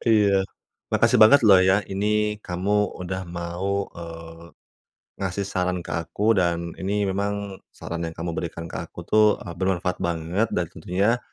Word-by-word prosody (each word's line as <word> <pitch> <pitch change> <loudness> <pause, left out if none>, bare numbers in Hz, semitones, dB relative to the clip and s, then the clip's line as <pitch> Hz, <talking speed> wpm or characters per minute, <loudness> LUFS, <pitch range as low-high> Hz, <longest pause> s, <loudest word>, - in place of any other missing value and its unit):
Iya. 100 -4 +4 0.5
Makasih - - +4
banget 140 +7 +8
loh 95 - +9
ya, 95 +2 +4
ini 105 +2 +1
kamu 100 +3 0
udah 95 +1 -4
mau, 90 +3 -3
eee, 85 0 -9 0.8
ngasih 95 0 -2
saran 90 -2 -1
ke - - -6
aku 85 +7 +1
dan 85 -1 -1
ini 100 +2 0
memang 100 0 -3
saran 85 0 -6
yang 80 - -8
kamu 85 +1 -3
berikan 85 -1 -4
ke - - -5
aku - - -12
tuh, 110 0 +5 0.2
eee, 85 - -7
bermanfaat 90 -1 0
banget 85 +6 0
dan 90 - +1
tentunya 100 +8 0
95 Hz, 155 wpm, -24 LUFS, 85-100 Hz, 0.8 s, loh